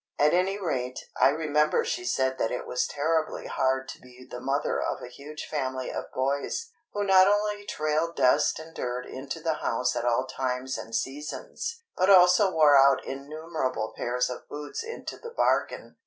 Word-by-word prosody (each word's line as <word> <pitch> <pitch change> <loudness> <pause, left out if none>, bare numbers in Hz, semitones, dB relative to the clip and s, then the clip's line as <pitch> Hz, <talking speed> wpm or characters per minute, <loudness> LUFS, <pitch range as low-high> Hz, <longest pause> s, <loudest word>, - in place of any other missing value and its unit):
At 150 +1 +4
any 185 +3 +2
rate, 130 -9 -2 0.2
I - - +5
remember 150 0 +1
she 365 - -3
said 130 - 0
that 115 - +1
it 125 - -4
was 125 - -1
terribly 155 +2 -1
hard 130 0 0
to - - -9
be 125 0 -15
the 125 - -7
mother 135 +3 -1
of - - -2
a - - -8
huge 145 +5 -9
family 130 -3 -3
of - - -6
boys, 140 - -2 0.2
who 205 - -2
not 190 -1 +6
only 205 0 0
trailed 155 +2 -1
dust 135 +4 +3
and 160 +1 -10
dirt 125 -2 -3
into 135 +4 -6
the 160 0 0
house 120 +2 0
at - - -1
all 120 +1 +2
times 130 0 -3
and 115 0 -6
seasons, 465 - -4
but 185 - +2
also 180 +1 +7
wore 150 -4 +6
out 135 -1 +5
innumerable 140 -4 -4
pairs 125 +1 0
of 125 - -8
boots 150 - -5
into 460 +1 -7
the 470 - -8
bargain. 475 - 0
145 Hz, 180 wpm, -27 LUFS, 130-170 Hz, 0.2 s, also